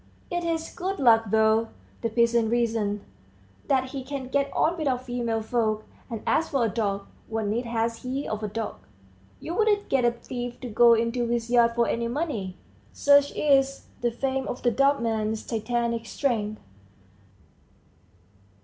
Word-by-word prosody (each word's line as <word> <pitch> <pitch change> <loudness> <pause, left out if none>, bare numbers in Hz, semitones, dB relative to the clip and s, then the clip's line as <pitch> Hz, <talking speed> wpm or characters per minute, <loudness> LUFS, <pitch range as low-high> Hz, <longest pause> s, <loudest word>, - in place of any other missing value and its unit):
"It's 350 0 -1
his 330 -1 -2
good 380 +2 -2
luck, 225 -3 +5
though," 220 +1 +3 0.3
the 230 - 0
peasants 235 0 +2
reason, 225 -3 0 0.6
"that 260 -2 +2
he 265 0 -5
can 265 -1 -5
get 280 +1 0
on 335 - +2
without 270 -6 -1
female 235 -3 -2
folk; 215 -2 0 0.3
and 230 -3 -5
as 325 - +2
for 270 -4 +1
a - - +1
dog 200 -2 -1 0.2
what 225 -1 -2
need 225 +4 -1
has 230 0 -1
he 265 +3 -3
of 215 0 -3
a 215 - -2
dog? 220 +2 -4 0.6
you 335 - -5
wouldn't 415 +1 +2
get 270 -2 +2
a 240 - +5
thief 240 +1 -6
to 250 - -5
go 235 +2 +6
into 230 +1 0
his 235 0 -1
yard 235 -1 +4
for 235 -1 +2
any 235 0 -1
money!" 235 - -3 0.3
Such 285 0 +4
is 275 -2 +2
the 240 - +2
fame 265 +2 -2
of 245 - -5
the 240 - +3
dumb 275 +1 +2
man's 220 -1 -1
Titanic 235 0 -1
strength. 215 -6 -1
235 Hz, 165 wpm, -26 LUFS, 225-270 Hz, 0.6 s, go